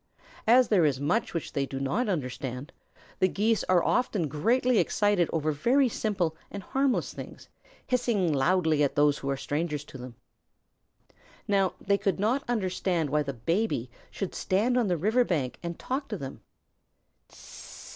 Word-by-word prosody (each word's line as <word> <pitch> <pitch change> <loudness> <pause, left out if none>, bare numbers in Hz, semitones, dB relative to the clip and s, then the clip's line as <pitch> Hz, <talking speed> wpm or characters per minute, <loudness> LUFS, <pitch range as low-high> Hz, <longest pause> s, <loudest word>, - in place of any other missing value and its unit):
As 245 +2 +6
there 195 -6 +4
is 140 -4 +2
much 175 +8 0
which 165 - -4
they 140 -1 -1
do 135 - -5
not 210 - -1
understand, 130 -3 -4 0.5
the 185 - +4
Geese 215 +3 +1
are 180 -2 +3
often 210 -9 +1
greatly 230 - +2
excited 205 -5 +2
over 155 -1 0
very 250 - +3
simple 195 -8 -1
and 200 -1 -7
harmless 270 +2 0
things, - - -10 0.4
hissing 235 -9 +1
loudly 160 +2 +2
at 140 -1 +1
those 145 0 +3
who 140 - -4
are 135 - 0
strangers 150 +1 -2
to 135 - -12
them. 125 -1 -9 1.3
Now 195 -2 +2
they 200 0 +1
could 195 -1 0
not 235 +7 +1
understand 185 - -1
why 150 0 +2
the 140 -1 -3
Baby 130 - -1 0.2
should 195 - -5
stand 215 +7 +1
on 245 -4 +2
the 175 -2 +1
river 220 +9 +2
bank 150 - -2
and 170 -1 -5
talk 275 +2 -3
to 210 - -4
them. 135 -5 -8
180 Hz, 160 wpm, -28 LUFS, 145-220 Hz, 1.3 s, As